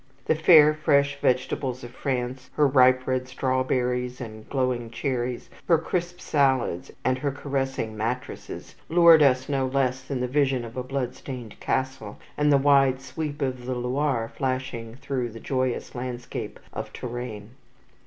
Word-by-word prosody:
The - - +3
fair 155 -1 +7
fresh 140 -2 +2
vegetables 130 0 0
of 120 - -8
France, 130 0 -3
her 150 - +4
ripe 130 -1 +5
red 130 0 -1
strawberries 125 -1 -1
and 110 -3 -9
glowing 125 -3 -1
cherries, 125 0 -3 0.2
her 165 - +6
crisp 175 +2 -3
salads 130 - +1 0.2
and 130 0 +2
her 140 +1 0
caressing 135 -5 -3
mattresses 115 +4 -5 0.2
lured 170 -1 +7
us 130 -2 +4
no 135 -2 0
less 130 -1 0
than 130 0 -4
the 125 - -1
vision 135 -2 +1
of 115 - -10
a 130 - -2
bloodstained 130 -2 -5
castle, 130 -5 -2 0.2
and 150 0 +2
the 140 - +6
wide 135 -2 +4
sweep 145 +2 -4
of 130 -2 -3
the 130 - -1
Loire 125 -1 -1
flashing 130 -4 -3
through 130 -2 -3
the 115 0 -10
joyous 130 0 -2
landscape 125 -1 -5
of - - -5
Touraine. 120 -3 -6
130 Hz, 150 wpm, -25 LUFS, 125-140 Hz, 0.2 s, fair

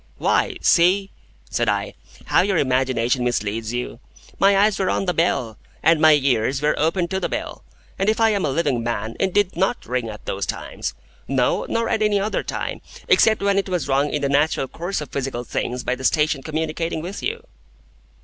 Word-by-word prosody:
"Why, - - +1
see," 190 +3 +3 0.4
said - - +1
I, - - -1 0.3
"how - - +3
your 190 0 +1
imagination 130 -2 +1
misleads 110 -2 -1
you. 120 -1 -4 0.4
My 195 0 +5
eyes 205 +1 +3
were 190 - +1
on - - 0
the 180 - 0
bell, 130 -9 0 0.2
and 160 0 +4
my 155 -1 +7
ears 135 -2 +1
were 150 +1 +2
open 170 +3 +1
to 190 - -1
the - - -2
bell, - - -5 0.4
and 195 - +2
if 220 - +1
I 225 -1 +4
am 200 -2 0
a - - +1
living 135 -4 0
man, 115 -1 -3
it 190 - +1
did 205 -1 +1
NOT 190 +7 0
ring 125 -2 -2
at 105 -1 -10
those 95 -1 -3
times. - - -5 0.3
No, 130 -2 +1
nor 230 0 0
at 220 - 0
any 210 -1 +2
other 210 +2 -1
time, - - -4 0.3
except 220 -2 +4
when 200 0 +3
it 195 - -3
was 175 -7 -1
rung 140 +2 +2
in 145 0 -2
the - - +2
natural 140 -1 +1
course 175 +5 -4
of 150 - -8
physical 130 -3 -3
things 125 +1 -3
by - - 0
the 130 +1 -7
station 150 0 +2
communicating 160 +2 -3
with 185 +4 -6
you." 460 +2 -3
155 Hz, 200 wpm, -22 LUFS, 125-195 Hz, 0.4 s, my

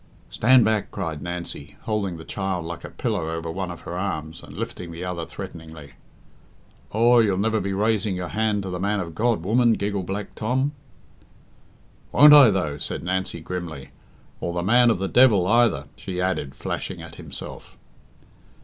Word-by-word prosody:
"Stand 125 +1 +5
back," 110 -2 +1
cried 80 -6 -4
Nancy, 85 -4 -6
holding 100 -5 -2
the 80 - -10
child 95 -4 -3
like 85 0 -6
a - - -7
pillow 105 -10 -2
over 80 0 -4
one 95 +2 -4
of 85 - -8
her 85 - -6
arms, 80 -5 -4
and - - -12
lifting 85 -1 -5
the 85 +2 -7
other 85 -2 -4
threateningly. 80 -3 -9 1.0
"Aw, 120 +3 +5
you'll 100 -5 +3
never 110 +2 +1
be 100 0 -2
raising 105 0 +1
your 90 -1 -4
hand 105 -2 0
to 95 - -5
the 90 - -4
man 100 +2 0
of 85 -3 -5
God, 110 0 +1
woman," 115 +4 +3
giggled 100 -3 -2
Black 100 +1 -4
Tom. 130 +6 0 1.4
"Won't 150 0 +8
I, 145 -5 +9
though?" 75 -7 -1
said - - -4
Nancy 90 -1 -2
grimly, 85 -5 -6 0.5
"or 85 - -3
the 85 - -1
man 120 +5 +5
of 115 - +2
the 95 +1 -2
devil 110 -6 +5
either," 115 - +3
she 90 -2 -6
added, 90 -7 -1
flashing - - -5
at - - -11
himself. - - -9
95 Hz, 175 wpm, -24 LUFS, 85-110 Hz, 1.4 s, I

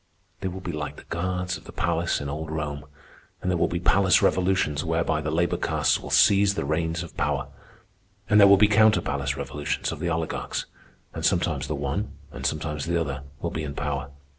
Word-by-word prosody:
They 95 - -3
will 95 +1 -5
be 90 - -4
like 75 -2 -4
the - - -12
guards 90 +1 -2
of - - -17
the - - -9
palace 85 0 0
in 70 - -4
old 75 +3 -4
Rome, 75 -2 -4 0.5
and 95 - -1
there 90 - +1
will - - +3
be 85 - -2
palace 95 +1 +4
revolutions 90 -6 +1
whereby 80 -1 0
the 75 - -2
labor 85 +3 +1
castes - - +1
will - - -8
seize 100 0 +5
the 70 - -2
reins 80 +3 -1
of 85 - -11
power. 75 -3 -1 0.8
And 105 - +5
there 100 - +9
will 100 0 +8
be 105 - +6
counter 105 -3 +5
palace 70 -1 -2
revolutions 75 +1 -3
of - - -6
the 85 +1 -1
oligarchs, 80 -1 -2 0.5
and - - -6
sometimes - - +1
the 75 - -2
one, 70 +9 -3 0.2
and - - -2
sometimes 75 -1 -3
the 85 0 +1
other, 70 -4 -3 0.2
will - - -2
be 80 - -3
in 70 -2 -5
power. 70 -2 -3
80 Hz, 210 wpm, -25 LUFS, 75-90 Hz, 0.8 s, there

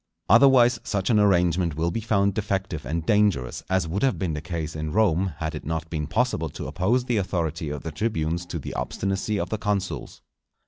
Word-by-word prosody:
Otherwise 120 +1 +6
such 100 +1 -1
an 110 - +4
arrangement 90 -4 +2
will 85 +2 0
be 115 - -2
found 100 -2 +2
defective 95 - -2
and 80 +2 -2
dangerous; 100 -12 +2
as 95 -3 +1
would 90 +5 -2
have 135 -1 +2
been 90 -5 -2
the 75 - -4
case 80 -1 -4
in 80 0 -3
Rome, 95 -4 +2
had 80 -1 -3
it - - -6
not 80 +1 -4
been 75 -3 -2
possible 95 -4 0
to - - -7
oppose 120 +7 0
the 120 -3 0
authority 85 -5 -2
of 75 -1 -5
the 80 - -4
tribunes 85 -2 -2
to 85 - -4
the 75 - -6
obstinacy 100 +2 -2
of - - -2
the 110 - -2
consuls. 100 -3 -3
90 Hz, 200 wpm, -25 LUFS, 80-105 Hz, -, Otherwise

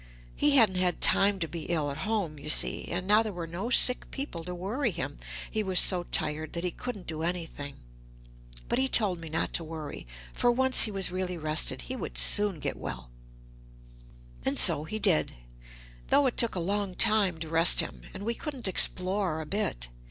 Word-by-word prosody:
He 290 -1 +2
hadn't 215 -8 +4
had 180 -2 0
time 200 0 +3
to 165 - -2
be 165 +1 -8
ill 155 -4 -2
at 140 - -8
home 185 -9 -3
you 150 +2 -8
see, - - +4
and 180 +1 -4
now 210 +3 +4
there 220 -2 -4
were 175 -3 -7
no 175 +8 -6
sick 250 0 +5
people 270 - -6
to 180 0 -6
worry 225 +9 -2
him, 170 - -6 0.3
he 220 - -2
was 190 -3 +2
so 180 -2 +4
tired 155 0 -1
that 170 - -4
he 180 - -2
couldn't 245 -4 -8
do 160 -1 -6
anything. 165 -5 -5 0.9
But - - -1
he 265 - +1
told 200 -8 +2
me 165 -1 -9
not 160 - -3
to 170 - 0
worry, 155 - -8 0.3
for 245 - +1
once 260 +1 +3
he 215 - -5
was 195 -2 +1
really 180 -1 -4
rested, 155 -1 +1
he 260 - -6
would - - -7
soon 205 -4 +3
get - - -4
well. - - -8 1.3
And - - -2
so 150 - +5
he 215 - -5
did, 190 -7 +1 0.7
though 285 - +3
it 255 - -1
took 235 -4 +2
a - - -2
long 195 +1 -2
time 210 -6 +3
to 160 0 -7
rest 165 +1 +3
him, 60 0 -2
and 200 - -9
we 235 - -1
couldn't 265 -2 -5
explore 185 -2 +1
a 160 - -6
bit. 150 - -3
180 Hz, 200 wpm, -27 LUFS, 160-215 Hz, 1.3 s, sick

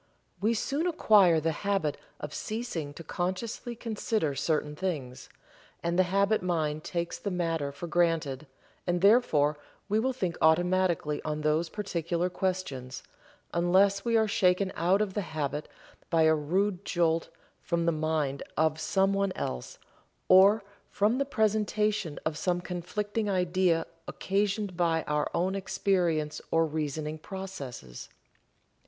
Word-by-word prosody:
We 225 +3 +2
soon 285 +9 -1
acquire 205 - +5
the 165 +1 0
habit 165 -4 -1 0.2
of 150 - -6
ceasing 215 -10 -4
to 165 - -8
consciously 190 - -3
consider 220 -8 -1
certain 150 +1 -1
things, 140 -8 -4 0.5
and 170 +1 0
the 185 -1 +3
habit 200 +3 +2
mind 155 -4 -1
takes 170 -1 -3
the 200 - -3
matter 165 -5 -1
for 140 +4 -7
granted, 165 -5 0 0.4
and 175 0 +1
thereafter 160 - +4 0.3
we 210 +1 +2
will 260 +4 +1
think 185 -10 -3
automatically 175 -2 +2
on 155 0 -3
those 155 +2 +1
particular 175 -3 -2
questions, 180 -10 -3 0.5
unless 190 +3 +3
we 230 -1 +2
are 220 -1 +3
shaken 190 -1 +2
out 185 +5 +3
of 195 -3 -5
the 205 - -1
habit 150 -4 -3 0.4
by 165 -1 +3
a 160 0 +5
rude 180 +6 0
jolt 165 -3 +1 0.3
from 170 -1 -1
the 170 - +3
mind 155 -3 -1 0.2
of 155 0 +2
someone 195 +3 +1
else, 60 -1 -4 0.5
or 195 +3 +7 0.3
from 215 +5 +1
the 280 - +1
presentation 215 - 0
of 155 -1 -2
some 175 +1 0
conflicting 205 +5 -3
idea 180 -2 +2 0.2
occasioned 200 0 -1
by 165 -2 +1
our 150 0 -1
own 180 +3 +1
experience 175 -5 0
or 165 0 +3
reasoning 155 0 -3
processes. 145 - -8
175 Hz, 135 wpm, -29 LUFS, 155-200 Hz, 0.5 s, or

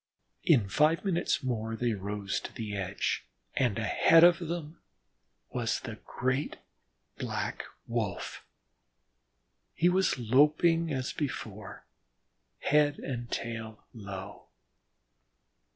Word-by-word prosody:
In 130 - +4
five 155 - +3
minutes 175 -5 +1
more 115 -3 -2
they 120 0 0
rose 100 0 -3
to - - -8
the 105 -2 -5
edge, 95 -9 -2 0.3
and 120 -6 +1
ahead 160 +9 +5
of 175 0 +7
them 170 -2 -5 0.7
was - - 0
the - - -7
great 130 +4 -1 0.6
Black - - -3 0.2
Wolf. 110 -6 -3 1.3
He 175 - +4
was 185 -3 +2
loping 150 +7 +3
as 130 -2 -2
before, 110 - -5 0.8
head 145 0 +3
and 120 -3 -5
tail 115 -2 -5
low. 100 -4 -8
125 Hz, 105 wpm, -30 LUFS, 110-155 Hz, 1.3 s, of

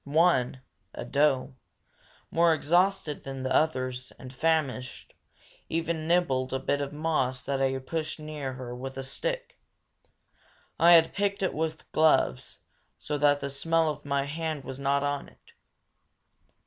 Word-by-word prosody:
One 140 -4 +2 0.3
a - - -5
doe, 140 -2 +1 0.7
more 165 -1 +4
exhausted 175 0 +1
than 135 -1 -6
the 130 - -1
others, 130 -5 0
and 130 -1 -10
famished 135 -4 -1 0.6
even 165 -1 -2
nibbled 135 -8 +1
a - - +1
bit 145 +2 -1
of 140 - -3
moss 150 -4 -1
that 135 -1 -1
I 135 0 +1
pushed 155 +4 -4
near 150 -3 -5
her 125 -1 -7
with 130 +1 -7
a 135 - -3
stick. - - -4 1.2
I 170 +1 +7
had 165 -1 +6
picked 200 -1 -1
it 190 - 0
with 160 0 -4
gloves, 155 - +2 0.4
so 150 -1 -3
that 145 0 +3
the 140 - -3
smell 165 +3 +1
of - - -9
my 140 -1 0
hand 155 0 -4
was 130 0 -7
not 140 +1 +1
on 145 -1 -2
it. - - -24
145 Hz, 150 wpm, -28 LUFS, 130-160 Hz, 1.2 s, I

